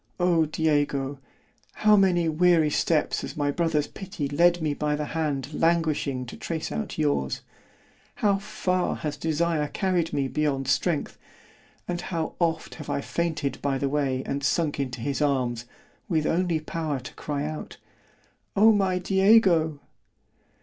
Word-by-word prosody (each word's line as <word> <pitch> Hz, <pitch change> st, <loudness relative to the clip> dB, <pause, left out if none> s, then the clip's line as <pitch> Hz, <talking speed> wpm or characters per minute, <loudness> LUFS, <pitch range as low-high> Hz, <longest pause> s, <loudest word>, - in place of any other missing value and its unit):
O 170 Hz, -3 st, +3 dB
Diego! 145 Hz, -3 st, 0 dB, 0.5 s
how 215 Hz, 0 st, +4 dB
many 180 Hz, -4 st, +3 dB
weary 160 Hz, -1 st, +3 dB
steps 155 Hz, 0 st, +1 dB
has -, -, -7 dB
my 145 Hz, -1 st, +1 dB
brother's 160 Hz, -2 st, +1 dB
pity 185 Hz, -7 st, -5 dB
led 170 Hz, +5 st, +3 dB
me 155 Hz, -3 st, 0 dB
by 150 Hz, +1 st, -1 dB
the 150 Hz, 0 st, -3 dB
hand 150 Hz, -3 st, -2 dB
languishing 155 Hz, -5 st, +1 dB
to 120 Hz, -, -9 dB
trace 160 Hz, -2 st, -4 dB
out 220 Hz, -, -4 dB
yours; 145 Hz, -, 0 dB, 0.7 s
how 200 Hz, -2 st, +2 dB
far 185 Hz, -2 st, -1 dB
has 150 Hz, -2 st, -4 dB
desire 160 Hz, 0 st, 0 dB
carried 175 Hz, +1 st, 0 dB
me 140 Hz, -1 st, 0 dB
beyond 135 Hz, -2 st, -1 dB
strength——and 175 Hz, +3 st, -4 dB
how 165 Hz, -3 st, -3 dB
oft 165 Hz, -2 st, 0 dB
have 150 Hz, -, -9 dB
I -, -, 0 dB
fainted 160 Hz, -1 st, -2 dB
by 140 Hz, -1 st, 0 dB
the 140 Hz, +1 st, -1 dB
way, 135 Hz, -2 st, 0 dB
and 140 Hz, +1 st, -3 dB
sunk 145 Hz, +1 st, 0 dB
into 130 Hz, -3 st, -3 dB
his 140 Hz, +4 st, -2 dB
arms, 125 Hz, -5 st, 0 dB, 0.4 s
with 160 Hz, -4 st, +1 dB
only 170 Hz, -1 st, +1 dB
power 155 Hz, -2 st, -3 dB
to 125 Hz, -, -10 dB
cry 145 Hz, -1 st, -3 dB
out—O 195 Hz, +6 st, -2 dB
my 195 Hz, -3 st, +2 dB
_Diego! 190 Hz, -5 st, +4 dB
155 Hz, 145 wpm, -26 LUFS, 145-175 Hz, 0.7 s, how